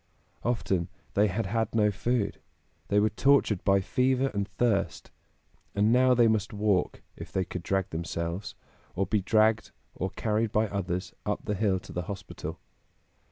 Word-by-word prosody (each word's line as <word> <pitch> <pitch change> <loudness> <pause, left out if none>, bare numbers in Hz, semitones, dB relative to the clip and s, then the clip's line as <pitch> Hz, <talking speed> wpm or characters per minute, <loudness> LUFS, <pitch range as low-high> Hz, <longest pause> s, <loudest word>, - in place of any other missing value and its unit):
Often 95 -7 0 0.2
they 105 +1 +4
had 105 +3 -1
had 115 +3 -1
no 105 -2 +4
food; 110 +2 -1 0.5
they 105 - +3
were 105 +1 +2
tortured 125 -4 +3
by 100 -1 +4
fever 130 +6 +1
and 100 -1 -1
thirst; 110 -6 -1 0.6
and 105 +3 +3
now 130 0 +5
they 120 -1 +5
must 110 -2 0
walk, 100 -3 0
if - - -9
they 95 -1 0
could 90 - -5
drag 95 +2 -1
themselves, 85 +3 -4 0.4
or 95 +2 +1
be 105 +2 +1
dragged 110 +3 +3 0.2
or 95 - -3
carried 110 +3 -1
by 110 +1 +2
others 90 -2 -3
up - - -2
the 105 - -1
hill 100 -2 +1
to - - -11
the 90 - -2
hospital. 100 -1 -6
105 Hz, 160 wpm, -28 LUFS, 95-115 Hz, 0.6 s, now